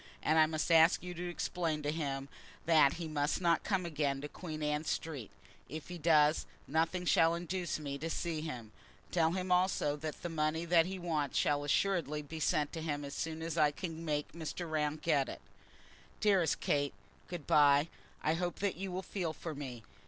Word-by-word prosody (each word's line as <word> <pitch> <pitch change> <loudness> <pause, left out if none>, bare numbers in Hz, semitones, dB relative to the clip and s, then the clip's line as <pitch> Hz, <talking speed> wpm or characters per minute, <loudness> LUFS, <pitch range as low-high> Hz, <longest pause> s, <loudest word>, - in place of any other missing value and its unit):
And 160 +1 +4
I 155 - +7
must 155 +1 -1
ask 165 +1 +6
you 180 0 -5
to 175 +1 -4
explain 165 -3 -2
to 145 - 0
him 140 -4 -3 0.4
that 155 -4 +5
he 170 -1 -5
must 150 -1 0
not 170 -2 +2
come 190 -3 0
again 145 -4 -1
to 145 - -4
Queen 155 -1 -6
Anne 150 0 0
Street. 150 -7 -3 0.4
If 155 +4 -7
he 175 -1 -6
does, 155 -1 +4 0.2
nothing 165 +4 0
shall 165 -1 +4
induce 175 +1 -2
me 140 -2 -5
to 165 +3 -3
see 165 -1 -2
him. 125 -9 -6 0.4
Tell 165 -1 +3
him 185 0 -2
also 180 -5 +2
that 155 0 -6
the - - -1
money 160 0 -1
that 170 0 +4
he 190 0 -4
wants 160 -6 -1
shall 145 0 +2
assuredly 150 -1 +1
be 160 +2 -7
sent 150 -1 +1
to 165 - -4
him 145 -2 -2
as 140 - -7
soon 160 0 -3
as 165 0 -2
I 150 - +6
can 165 +2 -6
make 150 -2 -1
Mr. 170 +1 -5
Round 155 -1 -1
get 145 -5 +2
it. - - -7 0.8
Dearest 195 -6 +3
Kate, 145 -1 0 0.3
good 175 -5 -6
bye. 145 0 +5 0.4
I 155 - +2
hope 175 +1 -2 0.2
you 190 0 -5
will 185 +1 -3
feel 175 -6 -3
for 160 0 -6
me. 130 -5 -7
160 Hz, 195 wpm, -33 LUFS, 150-170 Hz, 0.8 s, I